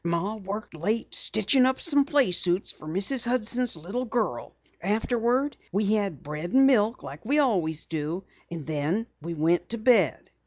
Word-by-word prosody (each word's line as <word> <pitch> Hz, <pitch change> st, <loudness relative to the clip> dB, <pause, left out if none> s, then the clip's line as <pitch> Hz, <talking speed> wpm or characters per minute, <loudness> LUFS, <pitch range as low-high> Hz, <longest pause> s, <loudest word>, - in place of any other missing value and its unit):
"Ma 170 Hz, +4 st, -1 dB
worked 205 Hz, -1 st, -6 dB
late 205 Hz, +8 st, -2 dB
stitchin' 235 Hz, +5 st, +3 dB
up 260 Hz, +1 st, +2 dB
some 285 Hz, -4 st, +3 dB
playsuits 185 Hz, -, +1 dB
for 155 Hz, -, -13 dB
Mrs. 200 Hz, -, 0 dB
Hudson's 245 Hz, -3 st, 0 dB
little 195 Hz, +11 st, -4 dB
girl. 220 Hz, -, -2 dB, 0.3 s
Afterwards 240 Hz, +7 st, 0 dB
we 205 Hz, +2 st, +1 dB
had 200 Hz, -9 st, -1 dB
bread 150 Hz, +4 st, -5 dB
and 270 Hz, +1 st, +6 dB
milk 230 Hz, -3 st, +3 dB
like 145 Hz, +4 st, -9 dB
we 280 Hz, +6 st, +1 dB
always 180 Hz, -, +1 dB
do, 160 Hz, +4 st, -4 dB, 0.3 s
and 165 Hz, -4 st, -7 dB
then 155 Hz, +8 st, -1 dB, 0.2 s
we 170 Hz, +2 st, -5 dB
went 165 Hz, +3 st, +1 dB
to 235 Hz, -, -1 dB
bed." 220 Hz, -, +2 dB
205 Hz, 160 wpm, -26 LUFS, 170-245 Hz, 0.3 s, and